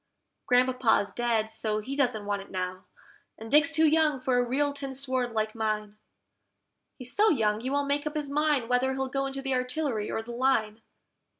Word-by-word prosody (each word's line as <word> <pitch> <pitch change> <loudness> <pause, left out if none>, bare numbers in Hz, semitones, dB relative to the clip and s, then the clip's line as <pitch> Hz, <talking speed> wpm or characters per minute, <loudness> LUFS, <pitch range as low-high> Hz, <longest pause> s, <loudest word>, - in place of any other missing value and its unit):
Grandpapa's 250 -4 +3
dead, 230 -2 0
so 220 -1 -1
he 245 +6 -4
doesn't 245 -7 0
want 205 -1 -2
it 195 - -13
now, 185 0 -4 0.5
and 225 +1 -9
Dick's 310 +2 +5
too 320 0 +3
young 310 -2 +3
for 255 0 +1
a - - +3
real 285 +4 0
tin 275 -1 -6
sword 255 -2 -1
like 215 -1 -1
mine: 215 -2 -2 1.0
He's 250 -2 -3
so 430 +1 +5
young 215 -6 +1
he 255 - -3
won't 285 +1 0
make 285 +1 0
up 300 - -5
his 295 -1 -3
mind 290 -3 +1
whether 250 +2 +1
he'll 265 0 -2
go 275 +1 -1
into 270 0 -6
the 270 -1 -1
Artillery 255 -3 -1
or 225 - -3
the 240 - -8
Line. 235 -3 0
255 Hz, 195 wpm, -28 LUFS, 220-280 Hz, 1.0 s, Dick's